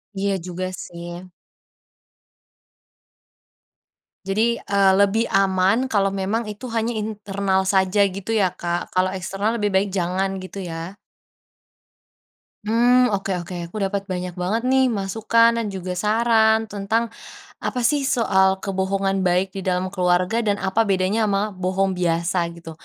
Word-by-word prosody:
Iya 195 Hz, 0 st, 0 dB
juga 185 Hz, +1 st, -4 dB
sih. 175 Hz, +1 st, -9 dB, 3.0 s
Jadi, 215 Hz, +5 st, +1 dB
eee, 200 Hz, -1 st, +3 dB
lebih 210 Hz, +3 st, +2 dB
aman 195 Hz, +6 st, +2 dB
kalau 195 Hz, -4 st, +1 dB
memang 200 Hz, +4 st, -1 dB
itu 210 Hz, +4 st, -7 dB
hanya 230 Hz, +1 st, -1 dB
internal 200 Hz, -3 st, -1 dB
saja 190 Hz, +1 st, +3 dB
gitu 195 Hz, +2 st, -5 dB
ya, 200 Hz, -5 st, +2 dB
Kak? 175 Hz, -1 st, -4 dB
Kalau 185 Hz, 0 st, +2 dB
eksternal 200 Hz, +5 st, -2 dB
lebih 205 Hz, -2 st, -1 dB
baik 195 Hz, +1 st, +2 dB
jangan, 190 Hz, +1 st, -1 dB
gitu 185 Hz, +1 st, -7 dB
ya? 165 Hz, +1 st, -6 dB, 1.7 s
Mmm. 245 Hz, +3 st, +4 dB
Oke 195 Hz, 0 st, -4 dB
oke, 175 Hz, +1 st, -8 dB
aku 170 Hz, +6 st, -9 dB
dapat 195 Hz, 0 st, -1 dB
banyak 180 Hz, -2 st, -4 dB
banget 195 Hz, +6 st, -1 dB
nih 265 Hz, 0 st, +4 dB
masukan 225 Hz, +1 st, +2 dB
dan 230 Hz, -, -1 dB
juga 180 Hz, -1 st, -4 dB
saran 220 Hz, +1 st, +3 dB
tentang 220 Hz, +3 st, -1 dB, 0.5 s
apa 250 Hz, -, -2 dB
sih 295 Hz, +3 st, +3 dB, 0.2 s
soal 190 Hz, -5 st, +3 dB, 0.2 s
kebohongan 195 Hz, 0 st, -1 dB
baik 185 Hz, +1 st, +1 dB
di -, -, -3 dB
dalam 185 Hz, 0 st, -1 dB
keluarga 180 Hz, +3 st, +1 dB
dan 205 Hz, -3 st, +1 dB
apa 195 Hz, +3 st, -1 dB
bedanya 195 Hz, +3 st, +1 dB
sama 195 Hz, -1 st, +1 dB
bohong 190 Hz, +1 st, 0 dB
biasa, 170 Hz, 0 st, 0 dB, 0.2 s
gitu. 165 Hz, -1 st, -10 dB
195 Hz, 135 wpm, -22 LUFS, 185-220 Hz, 3.0 s, Mmm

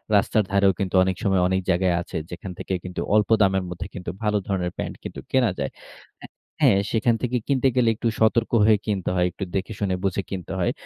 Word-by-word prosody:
রাস্তার 105 Hz, +1 st, +3 dB
ধারেও 100 Hz, -1 st, +4 dB
কিন্তু 95 Hz, -1 st, -2 dB
অনেক 95 Hz, -1 st, 0 dB
সময় 95 Hz, -3 st, +2 dB
অনেক 95 Hz, +1 st, +1 dB
জায়গায় 90 Hz, -1 st, +2 dB
আছে, -, -, -6 dB
যেখান 95 Hz, -, -7 dB
থেকে 95 Hz, -, -4 dB
কিন্তু 90 Hz, 0 st, -5 dB
অল্প 105 Hz, -1 st, +3 dB
দামের 95 Hz, -1 st, +3 dB
মধ্যে 90 Hz, +1 st, -6 dB
কিন্তু 90 Hz, -3 st, -6 dB
ভালো 105 Hz, 0 st, +2 dB
ধরনের 90 Hz, -3 st, -1 dB
প্যান্ট -, -, -4 dB
কিন্তু -, -, -7 dB
কেনা 125 Hz, -6 st, +3 dB
যায়। 70 Hz, -, -2 dB, 0.5 s
এ -, -, -10 dB, 0.4 s
হ্যাঁ, 105 Hz, -8 st, +6 dB
সেখান 115 Hz, +1 st, +2 dB
থেকে 125 Hz, 0 st, 0 dB
কিনতে 135 Hz, -1 st, +2 dB
গেলে 120 Hz, -3 st, +4 dB
একটু 115 Hz, -, -2 dB
সতর্ক 110 Hz, +1 st, +2 dB
হয়ে 110 Hz, -2 st, +5 dB
কিনতে 100 Hz, -4 st, -1 dB
হয়। 90 Hz, 0 st, +2 dB
একটু 95 Hz, -, -6 dB
দেখে 95 Hz, +3 st, -2 dB
শুনে 95 Hz, -3 st, 0 dB
বুঝে 95 Hz, +1 st, 0 dB
কিনতে 95 Hz, -1 st, -5 dB
হয়। 85 Hz, -, +1 dB
95 Hz, 210 wpm, -24 LUFS, 95-110 Hz, 0.5 s, হ্যাঁ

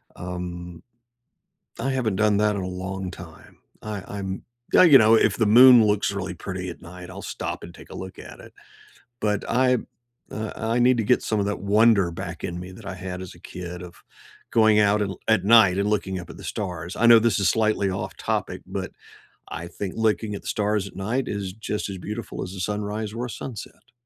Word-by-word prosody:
um 90 Hz, -1 st, -6 dB, 1.0 s
I 135 Hz, +3 st, -1 dB
haven't 120 Hz, -7 st, 0 dB
done 105 Hz, 0 st, +3 dB
that 105 Hz, 0 st, +2 dB
in 100 Hz, -, -3 dB
a -, -, -3 dB
long 95 Hz, 0 st, -5 dB
time. -, -, -13 dB, 0.2 s
I 105 Hz, -3 st, -5 dB
I'm 95 Hz, -2 st, -5 dB, 0.3 s
yeah, -, -, +7 dB
you 155 Hz, -7 st, +9 dB
know 110 Hz, -1 st, +6 dB
if -, -, +3 dB
the 110 Hz, -, +2 dB
moon 120 Hz, +1 st, +8 dB
looks 105 Hz, -1 st, +1 dB
really 95 Hz, -2 st, -4 dB
pretty 95 Hz, +1 st, -6 dB
at 85 Hz, -, -8 dB
night, 90 Hz, +1 st, -10 dB
I'll 95 Hz, +1 st, -9 dB
stop -, -, -5 dB
and 85 Hz, -, -9 dB
take -, -, -14 dB
a -, -, -9 dB
look 95 Hz, 0 st, -8 dB
at -, -, -11 dB
it. -, -, -14 dB, 0.7 s
But 105 Hz, -1 st, 0 dB
I 125 Hz, 0 st, +3 dB, 0.5 s
uh, 110 Hz, 0 st, -4 dB
I 115 Hz, +2 st, -1 dB
need 125 Hz, 0 st, +4 dB
to 115 Hz, -, +1 dB
get 125 Hz, -, +3 dB
some 110 Hz, -2 st, 0 dB
of 100 Hz, -, 0 dB
that 105 Hz, -3 st, -2 dB
wonder 100 Hz, -1 st, +4 dB
back 85 Hz, -1 st, -7 dB
in 85 Hz, -1 st, -3 dB
me 90 Hz, +1 st, -8 dB
that 100 Hz, +3 st, -13 dB
I 100 Hz, -, -4 dB
had 90 Hz, 0 st, -6 dB
as 95 Hz, -, -9 dB
a 85 Hz, -, -18 dB
kid 90 Hz, -1 st, -8 dB
of 90 Hz, -1 st, -11 dB, 0.5 s
going 110 Hz, -2 st, +4 dB
out 105 Hz, 0 st, +3 dB
and 100 Hz, -, -1 dB
l -, -, -12 dB
at 110 Hz, -4 st, +4 dB
night 105 Hz, -4 st, +6 dB
and 100 Hz, +1 st, +1 dB
looking 95 Hz, -3 st, -1 dB
up 90 Hz, -, -11 dB
at -, -, -10 dB
the -, -, -11 dB
stars, 90 Hz, -3 st, -5 dB
I 120 Hz, -, +3 dB
know 115 Hz, -1 st, +9 dB
this 115 Hz, 0 st, +2 dB
is 95 Hz, -, +3 dB
slightly 110 Hz, -3 st, +1 dB
off 95 Hz, -, -5 dB
topic, -, -, -3 dB
but -, -, -5 dB, 0.6 s
I 85 Hz, -, -6 dB
think 90 Hz, +2 st, -5 dB
looking 110 Hz, -1 st, 0 dB
at -, -, -7 dB
the -, -, -10 dB
stars 105 Hz, -1 st, 0 dB
at -, -, -13 dB
night 115 Hz, +7 st, -1 dB
is 100 Hz, -2 st, -4 dB
just 105 Hz, 0 st, -4 dB
as 95 Hz, -, -5 dB
beautiful 105 Hz, +5 st, -6 dB
as 95 Hz, 0 st, -7 dB
a 95 Hz, -, -8 dB
sunrise 105 Hz, +2 st, -3 dB
or 120 Hz, +2 st, -3 dB
a -, -, -6 dB
sunset. 115 Hz, -1 st, -9 dB
100 Hz, 220 wpm, -24 LUFS, 95-110 Hz, 1.0 s, you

